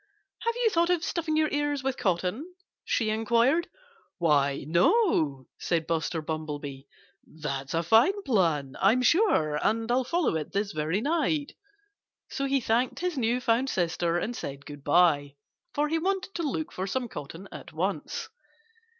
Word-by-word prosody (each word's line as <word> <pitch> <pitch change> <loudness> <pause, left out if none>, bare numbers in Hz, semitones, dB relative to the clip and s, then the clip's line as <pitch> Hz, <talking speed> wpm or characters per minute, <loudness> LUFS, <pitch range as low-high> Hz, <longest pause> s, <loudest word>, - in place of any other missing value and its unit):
Have 465 0 -1
you 480 -2 +2
thought 340 -1 +2
of 350 -2 +2
stuffing 320 -2 -1
your 310 0 +3
ears 290 -1 -1
with 265 -1 0
cotton?" 205 - -2 0.3
she 220 -2 0
inquired. 235 - +2 0.5
"Why, 140 -4 +2
no!" 165 - +2
said 165 -2 0
Buster 165 0 -1
Bumblebee. 150 -3 -5 0.4
"That's 140 -2 -5
a 165 - +1
fine 230 - +4
plan, 165 - +1
I'm 225 +6 +4
sure. 240 - +3
And 225 +1 +1
I'll 255 +1 +3
follow 335 - 0
it 155 - -6
this 200 0 -1
very 155 +6 -1
night." 305 0 0 0.8
So 275 - -2
he 275 0 +2
thanked 240 +1 0
his 360 -2 -1
new 240 -1 +1
found 245 +2 +1
sister 170 -2 0
and 235 +7 -2
said 140 -6 -6
good 145 -1 -10
by, 145 -3 +3 0.4
for 295 +1 +2
he 325 +2 0
wanted 385 +2 -1
to 340 - -3
look 315 +3 -3
for 190 +1 -4
some 250 +4 -2
cotton 165 +1 -8
at - - -9
once. - - -3
225 Hz, 160 wpm, -28 LUFS, -, 0.8 s, fine